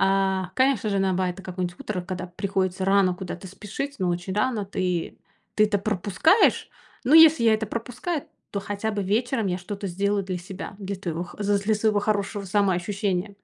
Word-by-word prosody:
А, 195 -1 +2
конечно 260 -5 +2
же 200 - +1
на 190 -1 +2
бай 185 0 +1
это 195 - -12
какой-нибудь 180 -1 -4
утро, 200 -4 -3
когда 180 0 -5
приходится 190 +1 -2
рано 195 -2 +4
куда-то 180 0 -7
спешить, 215 +9 -6
но 185 - 0
очень 175 +2 -2
рано, 215 -2 0
ты 180 -3 -2 0.4
ты 215 - +6
это 205 -1 +1
пропускаешь, 210 - +2 0.4
но 275 - +4
если 320 -5 +8
я 225 -1 +6
это 220 0 -2
пропускаю, 250 - -3 0.3
то 200 - -1
хотя 205 +2 -3
бы 205 - -1
вечером 220 +2 0
я 180 - -1
что-то 200 +2 -5
сделаю 200 +3 0
для 185 -1 -4
себя, 190 +2 -8
для 200 0 -4
твоего 175 -2 -4
х 175 - -13
з 205 0 +2
з 200 - -7
для 215 +1 +3
своего 210 0 +2
хорошего 205 -1 -1
самоощущения. 195 0 0
200 Hz, 190 wpm, -25 LUFS, 185-215 Hz, 0.4 s, если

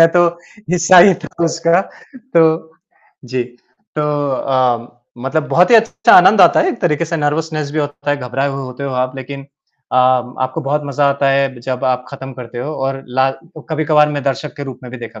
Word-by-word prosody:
मैं 165 - +8
तो 175 -1 +4 0.4
हिस्सा 180 +1 +5
ही 185 +1 +7
था - - -6 0.2
उसका, 165 +2 +2 0.4
तो 160 -9 +1 0.5
जी। 125 0 -2 0.5
तो 150 - 0 0.3
अ, 125 -2 -1 0.2
मतलब 150 +5 -2
बहुत 180 +6 +3
ही - - +7
अच्छा 225 0 +3
आनंद 195 +3 +6
आता 175 - +6
है - - +1
एक 370 - -4
तरीक़े 170 -3 0
से 165 +1 -3
नर्वसनेस 155 0 -2
भी 155 - -3
होता 145 0 -3
है, 145 - +1
घबराए 135 +2 -2
हुए 135 0 -5
होते 130 +2 -7
हो 135 - -3
आप 130 +1 -2
लेक़िन 140 +1 -7 0.5
अ, - - +1
आपको 130 +2 +1
बहुत 145 +1 -1
मज़ा 140 0 +1
आता 140 0 0
है, 135 -2 0
जब 130 +1 -4
आप 125 -1 0
ख़त्म 135 -1 -8
करते 120 -1 -9
हो 145 +5 -4
और 135 -1 -3
ला 130 +2 +1 0.4
कभी-कभार 155 -1 +3
मैं 145 -2 -3
दर्शक 145 +3 -3
के 145 - -6
रूप 130 -3 -8
में 125 - -10
भी 130 - -7
देखा 115 -2 -10
140 Hz, 200 wpm, -16 LUFS, 130-160 Hz, 0.5 s, मैं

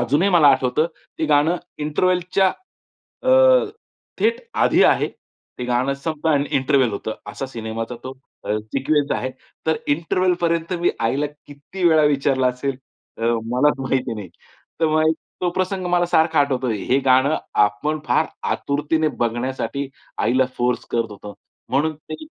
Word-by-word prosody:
अजूनही 145 +11 +2
मला 165 -6 +6
आठवतं 130 +5 +1 0.3
ते - - 0
गाणं 150 +4 +3 0.2
इंटरव्हलच्या 180 +5 +1 0.7
अ, - - +2 0.9
थेट 465 +2 +2 0.2
आधी - - +4
आहे. - - +3 0.5
ते 125 - -3
गाणं 125 +3 0
संपतं 155 +3 -3
आणि 145 -1 +2
इंटरव्हल 130 -2 +2
होतं. 110 +2 -4
असा 105 +6 -5
सिनेमाचा 115 -1 -5
तो 130 - -5 0.3
अ, 105 - 0
सिक्वेन्स 135 +7 -1
आहे. 130 - -2 0.4
तर 160 0 +2
इंटरव्हेलपर्यंत 170 +1 0
मी 175 - +3
आईला 135 +6 +1 0.2
किती 145 +6 -9
वेळा 160 -1 +5
विचारलं 135 -2 +2
असेल, 125 +1 -3 0.4
अ, - - -7 0.3
मलाच 140 +3 +3
माहिती 130 -2 -1
नाही. 105 -4 -7 0.5
तर 165 - +4
मग 155 0 +3 0.3
तो 180 - +1
प्रसंग 185 +1 -2
मला 175 0 +3
सारखा 160 -2 +3
आठवतो. 130 -2 0
हे 120 +5 +1
गाणं 130 +4 +4 0.3
आपण 125 +10 -2
फार 160 - +2 0.3
आतुरतेने 150 +2 0
बघण्यासाठी 130 +4 -2 0.3
आईला 130 +1 +2
फोर्स 125 0 0
करत 115 -2 -1
होतो. 105 0 -10 0.4
म्हणून 150 +4 +1
ते 155 - -9
140 Hz, 140 wpm, -21 LUFS, 125-160 Hz, 0.9 s, मला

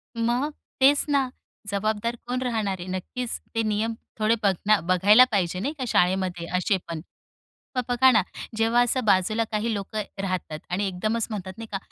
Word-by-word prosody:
मग 240 +6 0 0.3
तेच 280 +2 +5
ना, 275 -3 +2 0.4
जबाबदार 215 +3 -1
कोण 250 +1 -1
राहणार 215 -6 -1
आहे? 175 - -7
नक्कीच 190 +7 -4 0.2
ते 225 - +2
नियम 215 +1 0 0.3
थोडे 215 +1 +3
बघना 200 +2 +3
बघायला 190 +7 +6
पाहिजे, 180 -3 0
नाही 270 +10 -2
का, 265 - -3
शाळेमध्ये 180 -3 +1
असे 190 +2 +1
पण. 165 -2 -5 0.8
मग - - +3
बघा 245 +2 +5
ना, 220 -4 +5 0.4
जेव्हा 225 +2 +3
असं 250 +1 0
बाजूला 210 +3 +3
काही 220 +2 0
लोकं 210 +1 -3 0.2
राहतात 185 -5 -3
आणि 190 +3 0
एकदमच 215 +5 -1
म्हणतात, 190 -4 -5
नाही 225 0 -7
का, 195 - -1
215 Hz, 165 wpm, -25 LUFS, 190-235 Hz, 0.8 s, बघायला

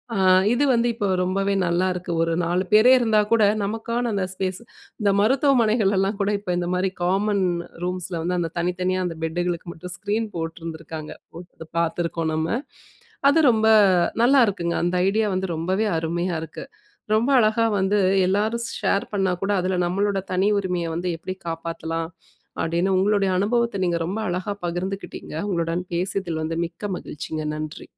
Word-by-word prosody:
ஆ, - - -1 0.4
இது 260 - +2
வந்து 235 0 +2
இப்போ 205 - -1 0.2
ரொம்பவே 195 +2 0
நல்லா 175 +2 +1
இருக்கு. 180 0 -5
ஒரு 165 - 0
4 180 +2 0
பேரே 220 +4 +7
இருந்தா 220 -3 +3
கூட, 230 - +4 0.2
நமக்கான 230 +3 -2
அந்த 190 - 0
ஸ்பேஸ், 190 +1 -3 0.4
இந்த 200 - +4
மருத்துவமனைகள்லலாம் 215 -5 +2
கூட, 200 - 0
இப்ப 185 -3 -3
இந்த 175 - -2
மாரி, 185 +1 0
காமன் 195 +1 +1 0.4
ரூம்ஸில 180 -2 -3
வந்து, 180 +1 -1
அந்த 165 -2 -2
தனித்தனியா, 180 +1 -1
அந்த 165 -2 -6
பெட்டுகளுக்கு 175 +1 -2
மட்டும் 180 +2 -7
ஸ்கிரீன் 215 +2 -1
போட்ருந்துருக்காங்க. 165 -1 -6 0.7
பாத்துருக்கோம் 165 -1 -1
நம்ம. 160 +1 -1 0.8
அது 305 - +4
ரொம்ப, 220 0 +2 0.6
நல்லாருக்குங்க. 205 -10 +3
அந்த 175 +1 0
ஐடியா 215 +1 +1
வந்து, 190 +1 -1
ரொம்பவே 185 +6 0
அருமையா 170 +2 -2
இருக்கு. 160 - -8 0.5
ரொம்ப 225 +5 +2
அழகா 225 0 +3
வந்து, 195 +2 +2 0.3
எல்லாரும் 215 +5 0 0.2
ஷேர் 200 - +1
பண்ணா 195 -2 +1
கூட, 195 +1 0
அதில 185 0 -1
நம்மளோட 195 +3 0
தனி 185 +2 +2
உரிமைய 180 -3 -1
வந்து, 175 +2 -3
எப்டி 185 +3 -6
காப்பாத்தலாம் 165 0 -4 0.5
அப்படின்னு, 175 +4 +1
உங்களுடைய 195 0 +2
அனுபவத்த, 230 0 0
நீங்க 170 -1 0
ரொம்ப 195 +6 -3
அழகா 185 +3 -2
பகிர்ந்துக்கிட்டிங்க. 185 0 -5
உங்களுடன் 170 -1 -1
பேசிதில 175 -2 -2
வந்து, 165 +1 -3
மிக்க 175 +5 -7
மகிழ்ச்சிங்க. 155 +1 -6
நன்றி. 155 0 -6
185 Hz, 150 wpm, -23 LUFS, 170-205 Hz, 0.8 s, பேரே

